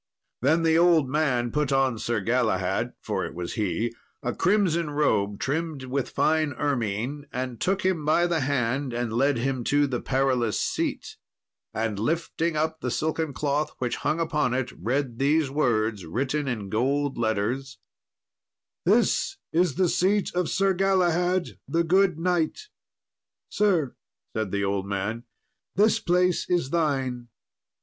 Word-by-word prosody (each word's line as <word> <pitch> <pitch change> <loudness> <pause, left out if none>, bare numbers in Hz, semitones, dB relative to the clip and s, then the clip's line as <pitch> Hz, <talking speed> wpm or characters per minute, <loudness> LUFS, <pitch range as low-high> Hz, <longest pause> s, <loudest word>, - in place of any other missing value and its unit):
Then 160 +6 +3
the 160 0 +4
old 170 -5 +4
man 130 -4 0
put 150 -2 0
on 135 -4 +2
Sir 115 -2 -1
Galahad 110 -4 0
(for - - -2
it - - -6
was 85 0 -4
he) 110 +2 -1 0.3
a 120 - -1
crimson 175 -4 +2
robe 105 -9 +1
trimmed 155 0 -2
with 130 +1 -2
fine 155 -2 +1
ermine, 130 +1 -2
and 125 -1 -4
took 190 0 0
him 185 -5 +1
by 155 +3 +3
the 170 -2 +1
hand 135 -1 -1
and 120 -1 -2
led 135 +3 +2
him 130 +1 -1
to 145 0 +3
the 130 -3 -2
Perilous 130 -4 +1
Seat, - - -2 0.5
and 110 -2 -2
lifting 165 +5 -1
up 160 +1 -1
the 125 - -2
silken 155 +4 -1
cloth 145 +2 -1
which 125 -2 -2
hung 160 - -1
upon 150 -7 0
it, 130 -1 -2
read 125 +3 -2
these 145 0 +2
words 110 -8 +1
written 135 - -2
in 110 -6 -3
gold 135 +5 0
letters, 115 +5 -1 1.1
"This 390 +1 +2 0.2
is 170 -3 +2
the 185 0 +3
seat 195 +4 +1
of 180 -1 0
Sir 195 0 +2
Galahad, 180 -1 +1
the 170 +1 +1
good 185 0 +3
knight." 180 - -1 0.8
"Sir," 175 -11 +1 0.4
said 110 -2 -1
the 100 +1 -1
old 100 0 -1
man, 105 +4 -3 0.5
"this 210 +2 +4
place 180 0 +1
is 170 -6 +1
thine." 135 -7 -1
140 Hz, 145 wpm, -26 LUFS, 120-165 Hz, 1.1 s, the